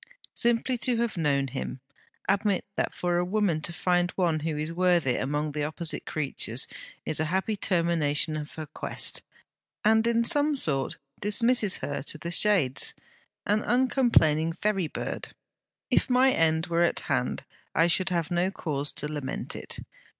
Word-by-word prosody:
Simply 240 +1 +1
to 245 0 +1
have 235 -1 -1
known 140 -5 +1
him! 130 0 -5 0.5
Admit 200 0 +1
that - - -1
for 175 -1 -1
a - - +1
woman 185 -4 0
to 160 - -2
find 175 +1 +1
one 170 -4 +1
who 155 0 -3
is 155 +2 -3
worthy 175 -7 +2
among 145 +3 -1
the 150 0 -2
opposite 155 +2 +2
creatures, 135 -4 -2 0.4
is 155 - -2
a 155 - +1
happy 190 +6 0
termination 170 -5 +1
of 150 -1 -5
her 155 - -5
quest, 145 - -3 0.6
and 220 +1 +4
in 235 0 +2
some 290 +5 +2
sort 140 - -1 0.2
dismisses 220 0 +2
her 145 +1 -3
to 150 - -2
the 170 +2 -5
Shades, 175 -10 +3 0.5
an 210 +1 +2
uncomplaining 230 - +3
ferry 195 -1 0
bird. - - -5 0.6
If - - +3
my 255 +1 +5
end 160 -4 +2
were 170 0 0
at 170 - +2
hand 60 - -1 0.3
I 165 - +5
should 185 +2 +1
have 170 -3 -1
no 175 +2 +1
cause 145 -6 -3
to 150 - -4
lament 150 -3 -4
it. - - -4
170 Hz, 160 wpm, -27 LUFS, 150-210 Hz, 0.6 s, my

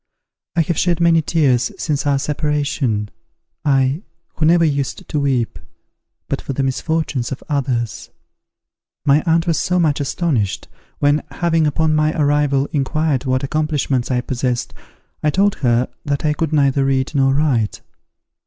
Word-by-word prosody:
"I 170 - +4
have 170 -1 -1
shed 175 -2 +1
many 170 -1 +4
tears 140 -7 +1
since 145 -2 -1
our 140 -1 +3
separation, 140 -7 -1 0.5
I 135 +1 +2 0.3
who 155 - +1
never 170 0 +5
used 140 -3 -2
to 150 - -1
weep, 130 -5 0 0.7
but - - -2
for - - -4
the 135 - -1
misfortunes 135 -1 -1
of 135 - -5
others! 130 -7 -2 1.0
My 145 +2 +4
aunt 165 +1 +3
was 165 -1 0
much 170 -5 +2
astonished, 140 - -1 0.3
when, 145 +1 +2
having, 165 -2 +1
upon 155 +2 +1
my 155 +1 +1
arrival, 145 -1 +2
inquired 145 -1 0
what 130 0 0
accomplishments 145 -3 -1
I 125 -1 +1
possessed, 125 -1 -2 0.5
I 155 - +2
told 195 +6 +2
her 120 -1 +2 0.2
that 145 +1 -1
I 150 - +2
could 160 0 -2
neither 140 -2 +3
read 135 0 0
nor 135 -2 +3
write. 135 -8 0
145 Hz, 145 wpm, -19 LUFS, 135-155 Hz, 1.0 s, never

